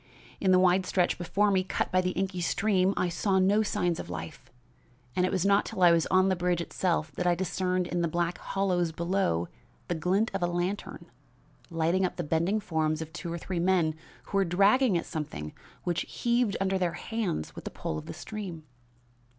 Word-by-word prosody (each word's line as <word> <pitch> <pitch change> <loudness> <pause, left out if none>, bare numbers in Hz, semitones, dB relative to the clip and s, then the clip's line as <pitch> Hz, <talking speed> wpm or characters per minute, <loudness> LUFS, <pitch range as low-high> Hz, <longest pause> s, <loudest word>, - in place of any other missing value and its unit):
In 190 - +1
the 185 - +6
wide 185 0 +3
stretch 180 -2 +1
before 195 +4 +1
me 190 -1 +2
cut - - -2
by 185 - +3
the 180 - 0
inky 190 -1 -1
stream, 195 +1 +2
I 180 - +2
saw 190 +3 0
no 195 +3 +4
signs 175 -5 0
of - - -7
life, 80 -2 -7 0.7
and 180 0 +2
it - - -2
was 190 -1 0
not 200 +1 +4
till 185 - -2
I 175 - +8
was 165 -1 +3
on 185 0 +4
the 190 - +2
bridge 175 -1 0
itself 170 -2 -1
that 180 - -2
I 175 - +4
discerned 185 0 -1
in 175 0 -2
the 170 - +1
black 170 +1 -1
hollows 180 -4 0
below 170 - 0 0.4
the - - +1
glint 185 +7 +1
of 195 - -2
a 175 - +2
lantern, 175 +3 -3 0.6
lighting 165 +2 +1
up 185 - -1
the 175 - -3
bending 170 +7 +1
forms 160 -5 -1
of 160 0 -13
two 175 -1 -5
or 170 - -3
three 175 +1 -4
men 175 -3 +2 0.3
who 200 - -3
were - - +4
dragging 200 +5 +4
at - - -3
something 75 - -5 0.3
which 175 -1 0
heaved 235 -3 +1
under 190 0 0
their 175 -2 0
hands 190 - -3
with - - -9
the - - -3
pull 80 - -4
of - - -12
the - - -5
stream. 180 -3 -7
180 Hz, 205 wpm, -28 LUFS, 170-195 Hz, 0.7 s, I